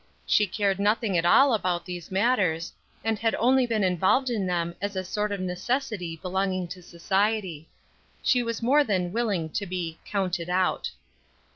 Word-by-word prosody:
She 210 - +3
cared 195 0 0
nothing 210 0 +1
at 170 0 +2
all 270 +9 +6
about 180 -5 0
these 175 -2 -7
matters, 190 -6 +1 0.3
and 220 -1 0
had 225 0 +1
only 255 +2 +3
been 220 -3 0
involved 190 +8 +2
in 205 -5 -1
them 170 -1 -1
as 205 0 -3
a 185 - -2
sort 210 +3 -2
of 200 - -2
necessity 185 -1 -2
belonging 185 -1 -1
to 180 +1 -8
society. 190 -1 -1 0.5
She 250 - +3
was 230 -1 -3
more 285 +5 +5
than 185 -7 -1
willing 210 -8 0
to 200 +5 -3
be 175 -3 -4
"counted 185 -4 -2
out." 185 0 +1
190 Hz, 165 wpm, -26 LUFS, 180-220 Hz, 0.5 s, all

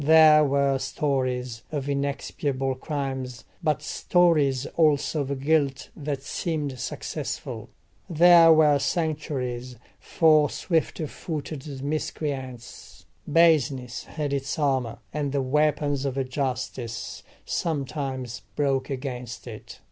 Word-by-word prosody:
There 155 0 +7
were 140 -1 +2
stories 130 -5 -1
of 145 -3 -3
inexpiable 140 -1 -1
crimes, 130 -2 -4 0.2
but 150 -3 0
stories 150 -7 +2
also 155 -1 +2
of 140 -1 -3
guilt 140 -2 +1
that 145 -2 -4
seemed 145 -4 -3
successful. - - -5 0.4
There 170 0 +7
were 150 -3 +5
sanctuaries 135 -5 -2 0.2
for 155 -2 +4
swift 165 -3 -1
footed 145 -3 -6
miscreants: 135 -4 -5 0.3
baseness 140 -7 +3
had 150 -3 -3
its 135 +3 -2
armour, 130 -6 0 0.2
and 145 -2 -2
the 140 -2 +1
weapons 145 0 +1
of 135 -2 -2
justice 125 -4 -4 0.2
sometimes 135 -6 -3
broke 135 -2 0
against 125 -4 -5
it. 115 -3 -10
140 Hz, 100 wpm, -26 LUFS, 130-155 Hz, 0.4 s, There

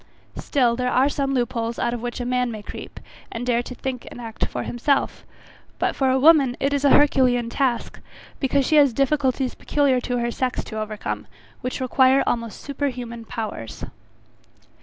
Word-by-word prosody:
Still 245 -5 +1
there 250 +1 -1
are 260 +3 +3
some 275 -2 -1
loop 240 -2 0
holes 230 0 -2
out 235 - 0
of 240 - -4
which 240 0 -4
a 245 - -3
man 250 0 0
may 215 -2 -7
creep, - - -9 0.3
and 235 +2 -4
dare 240 -1 +2
to 250 +1 -8
think 255 -1 -5
and - - -10
act 230 -2 -3
for - - -4
himself; 270 +3 -1 0.5
but - - 0
for 265 -1 +2
a 260 - +3
woman 280 -4 +5
it 275 +1 0
is 285 -1 0
an 280 - +5
herculean 250 -5 +4
task, 255 -3 -1 0.4
because 275 0 +1
she 310 - +3
has 280 -4 +5
difficulties 270 -1 +1
peculiar 275 -4 +1
to 245 0 -2
her 235 0 -1
sex 255 +1 -2
to 220 - -6
overcome, 215 0 -4 0.3
which 255 -1 -3
require 260 +1 +4
almost 230 -2 -2
super 285 0 -2
human 235 -3 -6
powers. 215 - -6
250 Hz, 185 wpm, -23 LUFS, 235-275 Hz, 0.5 s, woman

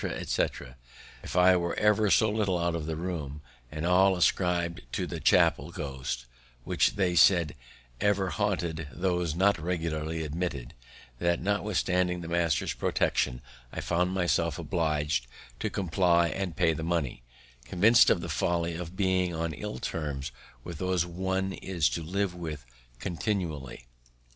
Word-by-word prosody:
etc., 60 - -2 0.5
if - - -7
I 90 0 +6
were 85 -1 -2
ever 105 0 +3
so 110 +2 +4
little 105 -4 +1
out 85 0 0
of 80 -2 -3
the 80 - -2
room, 80 -4 -4 0.3
and 75 +2 -4
all 95 +2 +4
ascribed 85 -1 +1
to - - -1
the - - -5
chappel 70 +5 +3
ghost, 65 -7 -5 0.4
which - - +1
they 90 -2 +1
said 85 -4 +5 0.5
ever 100 -2 +1
haunted 85 -7 -1
those 90 -2 -1
not 95 0 +3
regularly 80 -1 -2
admitted, 75 -5 -4 0.5
that, 85 0 +1
notwithstanding 90 -3 0
the 85 - -7
master's 85 -3 0
protection, 60 0 0 0.3
I - - -5
found 90 +1 0
myself 85 -3 +1
oblig'd 75 - -1 0.3
to - - -1
comply 85 -2 +2
and 95 -3 -3
pay 80 - +3
the 80 - -5
money, 80 -7 -1 0.4
convinc'd 110 - +5
of 85 - +3
the - - -5
folly 85 -1 0
of 85 +1 -6
being 95 -3 +1
on 80 0 -2
ill 70 - -5
terms 70 -1 -4 0.3
with 85 -4 -7
those 90 -2 +1
one 95 +2 -2
is 85 -6 0
to 85 - -3
live 95 +3 -1
with 80 -6 -6 0.3
continually. 85 - -3
85 Hz, 145 wpm, -28 LUFS, 80-95 Hz, 0.5 s, I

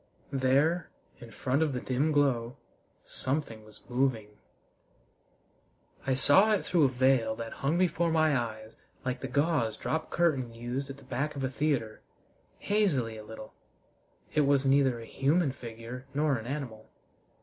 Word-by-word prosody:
There, 140 +6 +2 0.3
in 120 - -11
front 130 +6 -1
of 155 -3 +1
the 125 - -2
dim 130 +5 0
glow, 130 -4 +1 0.5
something 130 -5 -3
was 110 0 -16
moving. 120 -4 0 1.8
I 130 - +2
saw 190 +11 +5
it 205 - 0
through 170 -5 +3
a - - +4
veil 125 -3 +2
that 115 0 -6
hung 145 +5 +1
before 170 -1 +2
my 155 -2 +3
eyes 110 -2 -4 0.3
like 130 0 -2
the 135 - -3
gauze 140 -4 +1
drop 160 0 -2
curtain 135 -9 +1
used 125 +4 -4
at 135 - -7
the 140 - -15
back 140 +3 -3
of 135 - -4
a 130 - -1
theater 130 -7 -1 0.6
hazily 160 - +1
a 110 - -9
little. 110 0 -10 0.8
It 150 - +3
was 140 -1 +3
neither 135 -3 +3
a 115 - -8
human 145 +5 +1
figure 120 +1 -9
nor 150 -1 +2
an 115 -1 -5
animal. 125 -6 -5
135 Hz, 155 wpm, -29 LUFS, 120-150 Hz, 1.8 s, saw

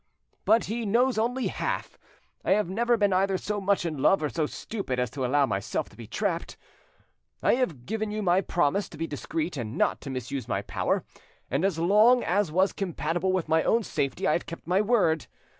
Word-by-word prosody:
But 230 - +4
he 230 +3 -3
knows 235 +3 +2
only 245 +3 0
half: - - -3 0.4
I - - +3
have 210 -2 +1
never 235 +6 +1
been 205 -3 +2
either 190 +1 +2
so 205 +2 -3
much 195 -2 +1
in 155 -4 -3
love 175 +5 +3
or 150 - 0
so 155 0 -1
stupid 195 - -4
as 125 -3 -1
to 135 - -4
allow 140 +3 +3
myself 100 -4 -2
to - - -18
be 115 -2 -10
trapped. 175 - -2 0.9
I - - +4
have 170 - -1
given 220 +1 -2
you 210 0 -3
my 180 0 +3
promise 175 +2 0
to 160 - -11
be 165 - -2
discreet 160 +2 -3
and 115 -2 -4
not - - +1
to 140 - -7
misuse 130 0 -4
my - - -1
power, - - -1 0.5
and 135 +6 0
as 195 -4 +1
long 210 +9 +5
as 190 -1 +1
was 190 +4 +2
compatible 175 -1 -1
with 185 -3 -1
my 160 0 +3
own 230 +6 +2
safety 140 -8 -2
I - - +3
have 175 - -1
kept 165 - -8
my 185 +3 +2
word. 200 - +2
180 Hz, 210 wpm, -27 LUFS, 150-210 Hz, 0.9 s, long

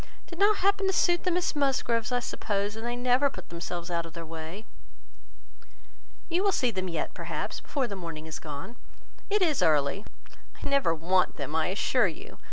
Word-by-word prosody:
It - - -21
did 340 - -7
not 415 +1 +5
happen 400 0 +3
to 385 - +2
suit 350 -1 +3
the - - +3
Miss 355 -2 +1
Musgroves, 260 -5 +1
I 245 0 +2
suppose, 205 -3 -2
and 225 - -6
they 240 +1 -1
never 250 +3 +3
put - - -10
themselves 170 +1 -5
out 170 -1 0
of 165 -1 -10
their 165 -1 -6
way." 165 +6 -7 1.6
"You 355 +2 +1
will 400 - +4
see 250 -9 +2
them 185 -3 -2
yet, 165 -3 -2
perhaps, - - -4
before 275 -3 -1
the 205 -4 -4
morning 165 -4 -6
is 160 -1 -5
gone. 150 +9 -7 0.5
It 410 -1 +3
is 310 -6 +2
early." 150 +5 +3 0.6
"I - - -1
never 275 -12 +3
want 180 +3 +2
them, 145 +1 -4
I 160 -1 +2
assure 205 +4 +2
you. 165 - -8
210 Hz, 195 wpm, -29 LUFS, 165-280 Hz, 1.6 s, not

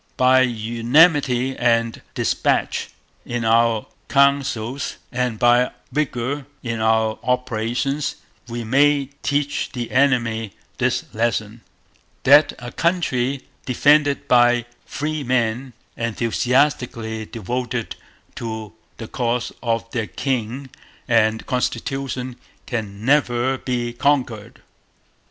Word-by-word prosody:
By 130 0 +5
unanimity 125 +3 +3
and 115 -1 +1
despatch - - 0 0.3
in 120 -1 -3
our 115 -1 +3 0.2
councils 140 -3 +1 0.2
and 125 -2 -1
by 120 +2 +4 0.2
vigour 140 -1 -2 0.2
in 115 -2 -3
our 110 0 +2
operations 125 +3 -1 0.3
we 120 0 -4
may 140 +3 +3
teach 145 0 -1
the 120 -3 -4
enemy 120 -5 +1 0.3
this - - +1
lesson: 110 0 -1 0.6
That 145 +3 +6
a 120 0 -8
country 140 -7 0 0.2
defended 145 +2 +3
by 120 -1 +4 0.2
free 155 0 -3
men, 125 0 0 0.2
enthusiastically 115 - 0
devoted 120 +1 -4 0.4
to 110 -4 -5 0.2
the 115 - -7
cause 120 0 -1
of 115 -1 -2
their 115 -3 -2
King 130 0 -3 0.4
and 110 -2 +2
Constitution, 130 -1 -3 0.3
can 105 -3 -5
never 130 -2 +2
be 120 -2 -2
conquered.' 125 -4 -1
125 Hz, 95 wpm, -21 LUFS, 115-135 Hz, 0.6 s, That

